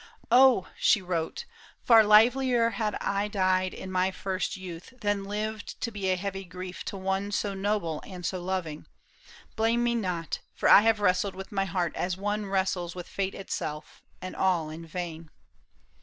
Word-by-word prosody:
" - - -30
Oh! 250 -5 +6
" - - -23
she - - +6
wrote, 180 - -3 0.2
" - - -27
Far 225 -2 +8
liever 235 +3 +5
had 215 -3 -2
I 200 +1 -1
died 185 -2 +1
in 190 - -7
my 185 0 +2
first 190 0 -3
youth. 185 +5 -9
Than 205 -2 0
lived 215 +1 -4
to 230 - -3
be 200 -3 -2
a 185 - +3
heavy 195 +1 -4
grief 180 0 -8
to 200 - -5
one 195 +1 -2
So 205 0 -1
noble 195 -5 -1
and 180 -3 -8
so 185 0 -2
loving. 175 -4 -4 0.7
Blame 230 +2 +2
me 240 0 +2
not; 180 -8 -2 0.2
For - - 0
I - - +9
have 220 -1 +2
wrestled 185 0 +2
with 190 0 -8
my 195 -1 0
heart 175 -2 -2
as 180 0 -2
one 205 +1 -2
Wrestles 190 -3 -1
with 180 -1 -7
fate 195 -1 -3
itself; 155 -5 -5 0.2
and 185 - -6
all 175 -5 +1
in 165 +1 -9
vain." 165 -1 -6
190 Hz, 185 wpm, -28 LUFS, 180-210 Hz, 0.7 s, I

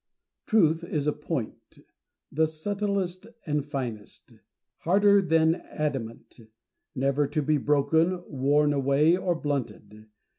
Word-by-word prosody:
Truth 165 -7 +3
is 150 -4 -3
a 150 - +1
point; 150 -5 -6 0.5
the 160 +2 +2
subtilest 195 +3 -3 0.2
and 150 -2 -1
finest; 125 -7 -7 0.5
harder 200 +3 +4
than 160 -3 +3
adamant; 135 -9 -5 0.6
never 140 +2 +1
to 150 +1 -2
be 150 +1 +1
broken, 160 +6 +1
worn 145 +2 +2
away, 140 +4 +3
or 180 -1 -1
blunted. 120 -8 -5
150 Hz, 110 wpm, -26 LUFS, 140-170 Hz, 0.6 s, harder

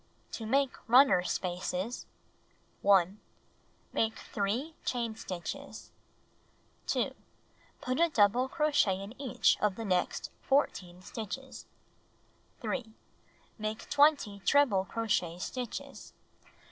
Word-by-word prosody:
To 225 - -5
Make 270 +2 +3 0.2
Runner 245 -7 +7
Spaces 180 +4 -3 0.7
1. 195 0 +4 0.7
Make 225 0 +1
3 230 +10 -2
chain 235 -3 -2
stitches. 180 -5 -7 1.0
2. - - 0 0.7
Put 255 +2 -1
a 340 0 +5
double 235 0 +3
crochet 290 - +2
in 200 +3 -7
each 265 -4 +2
of'the 210 +2 0
next 180 -3 0
14 185 -10 0
stitches. 230 +6 -7 0.9
3. 225 -5 -3 0.6
Make 215 0 -4
20 285 -9 +4
treble 205 -4 +3
crochet 195 -5 -1
stitches. 245 +6 -6
220 Hz, 95 wpm, -31 LUFS, 195-260 Hz, 1.0 s, Runner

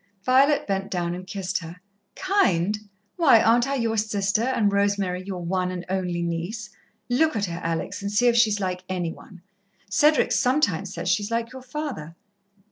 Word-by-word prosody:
Violet 270 +4 +4
bent 195 -1 -2
down 175 -2 -2
and 185 +1 -7
kissed 195 0 -3
her. 165 0 -9 0.4
"Kind! 210 - +1 0.3
Why, 295 -10 +6
aren't 235 +3 +3
I 275 - -1
your 230 -3 -1
sister, 205 -1 0
and 230 -4 +1
Rosemary 200 -2 0
your 185 -3 -6
one 180 +1 0
and 180 -1 -5
only 180 -2 -1
niece? 175 +6 -4 0.4
Look 295 +4 +2
at 205 -2 0
her, 175 -1 -6
Alex, 165 +3 -3
and 200 0 -3
see 210 +4 +2
if 240 -1 +4
she's 220 -3 +3
like 185 -2 -3
any 175 -3 -2
one. 180 -3 -15 0.5
Cedric 300 +8 +3
sometimes 215 - +1
says - - -5
she's 205 +4 +1
like 230 0 -2
your 260 0 -9
father." 255 - -6
200 Hz, 175 wpm, -24 LUFS, 180-240 Hz, 0.5 s, Why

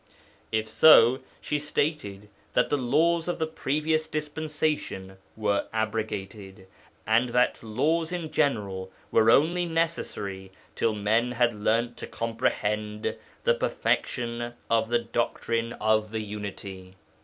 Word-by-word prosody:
If 110 0 0
so, 125 0 +7 0.2
she 150 - -1
stated 145 -9 -2 0.3
that 125 - +2
the - - +4
laws 160 +7 +2
of 175 - -1
the 160 - 0
previous 155 +1 -1
dispensation 150 -10 -3 0.2
were 105 -2 0
abrogated, 105 -3 -4 0.4
and 115 +3 +3
that 125 +1 +2
laws 155 +10 0
in 170 -3 -4
general 100 -10 0 0.2
were 110 0 +5
only 170 +8 +4
necessary 105 - -2 0.2
till 115 -2 0
men 110 +4 +1
had 120 0 +2
learnt 115 +3 0
to - - -6
comprehend 105 -2 -2 0.3
the 485 - +4
Perfection 120 - -1 0.2
of 115 -1 +2
the 120 - +3
Doctrine 115 0 -1
of 110 0 +1
the 110 0 -3
Unity. 100 -3 -7
115 Hz, 120 wpm, -27 LUFS, 105-150 Hz, 0.4 s, so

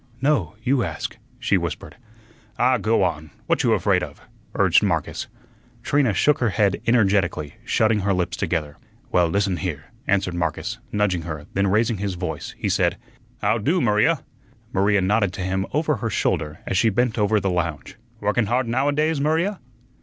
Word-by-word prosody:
"No, 125 - +1
you 130 +1 +2
ask," - - -4 0.2
she - - +1
whispered. - - -5 0.6
"Ah, 125 0 +3
go 110 0 +2
on; 80 -3 -2 0.2
what - - +1
you - - +3
'fraid - - +2
of?" - - -7 0.4
urged - - +4
Marcus. - - -1 0.6
Trina 140 -5 +2
shook 150 +1 +3
her 120 - +2
head 100 -1 +1
energetically, 95 -10 +2
shutting 110 -1 +2
her 100 0 0
lips 90 -2 0
together. 75 -4 -2 0.3
"Well, 90 -1 +4
listen 95 +1 0
here," 80 -7 -5 0.2
answered 95 -2 +1
Marcus, 85 -2 -2
nudging 105 -4 +1
her; 75 -3 -6
then 100 +1 +1
raising 110 +3 +2
his 100 -1 -3
voice, 80 -4 -5
he - - -2
said: - - +1 0.5
"How 115 - +2
do, 160 - +1
Maria?" 105 -4 +2 0.5
Maria 100 +1 +3
nodded 100 0 +1
to 95 - -5
him 95 +1 -1
over 150 -1 +1
her 115 +2 -2
shoulder 75 -6 -1
as 95 - 0
she 115 - +4
bent 120 +2 0
over 105 +1 +3
the 95 -1 -1
lounge. 85 -5 -3 0.3
"Workun 105 +2 +1
hard 120 +2 +1
nowadays, 145 +5 +1
Maria?" 165 +7 +1
100 Hz, 170 wpm, -23 LUFS, 90-120 Hz, 0.6 s, urged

